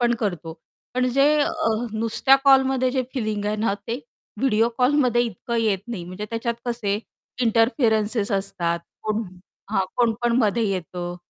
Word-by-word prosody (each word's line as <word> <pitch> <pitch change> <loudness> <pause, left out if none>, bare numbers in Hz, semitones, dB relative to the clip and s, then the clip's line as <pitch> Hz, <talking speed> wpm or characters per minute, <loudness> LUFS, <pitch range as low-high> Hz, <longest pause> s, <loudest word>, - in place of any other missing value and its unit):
पण 240 0 +3
करतो. 170 -6 -3 0.4
पण 255 0 +2
जे 275 +1 +5
अ, 315 -8 0 0.2
नुसत्या 230 +4 +3
कॉलमध्ये 265 -1 +4
जे 260 0 0
फिलिंग 215 -4 -2
आहे 210 +1 0
ना, 210 -2 0
ते 235 +3 -2 0.4
व्हिडिओ 230 -4 +3
कॉलमध्ये 250 -2 +3
इतकं 235 +1 -4
येत 215 -4 +2
नाही 210 -8 -5
म्हणजे 185 +4 -6
त्याच्यात 230 +1 -2
कसे 230 -4 -1 0.4
इंटरफेरन्स 225 -1 +2
असतात 180 -4 -1 0.2
कोण 215 +1 -1 0.5
हां, 195 -3 +1
कोण 235 -2 +3
पण 240 0 +2
मध्ये 230 -1 +2
येतं 175 -1 -4
230 Hz, 150 wpm, -23 LUFS, 205-250 Hz, 0.5 s, जे